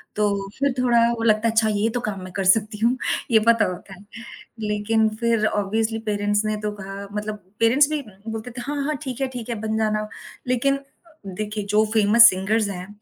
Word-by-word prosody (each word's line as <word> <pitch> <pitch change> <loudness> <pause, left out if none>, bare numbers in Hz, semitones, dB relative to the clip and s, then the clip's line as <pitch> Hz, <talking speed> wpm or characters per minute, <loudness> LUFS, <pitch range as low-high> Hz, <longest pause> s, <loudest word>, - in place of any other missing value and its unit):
तो 200 -2 0
फिर 280 -2 +1
थोड़ा 240 -2 +3 0.2
वो 225 - -3
लगता 215 0 +3
है 225 - +2
अच्छा 220 -1 +2
ये 225 +2 +2
तो - - -1
काम 195 -3 -4
मैं 185 - -9
कर 195 - -2
सकती 215 -1 -3
हूँ, 245 +2 +2 0.3
ये 220 - +6
पता 230 -1 +5
होता 185 +2 -10
है। 190 +2 -15 0.5
लेकिन 215 +1 +1
फिर 230 -2 +1
ऑब्वियसली 220 +2 -1
पेरेंट्स 205 0 0
ने 215 - 0
तो 210 - -1
कहा 195 +1 -7
मतलब 210 -1 -5 0.2
पेरेंट्स 260 +6 +4
भी 305 -1 -1 0.3
बोलते 225 +2 -5
थे, 245 - -7
"हाँ, 290 -1 -2
हाँ 305 +1 -1
ठीक 260 -2 -5
है, 270 - +1
ठीक 235 0 -7
है, 235 - -2
बन 220 0 -1
जाना।" 215 -1 0 0.4
लेकिन 275 +3 +1 0.5
देखिए 210 +2 -4
जो 215 - +5
फेमस 225 +2 +7
सिंगर्स 200 +3 0
हैं, 185 -1 -6
220 Hz, 205 wpm, -23 LUFS, 205-235 Hz, 0.5 s, फेमस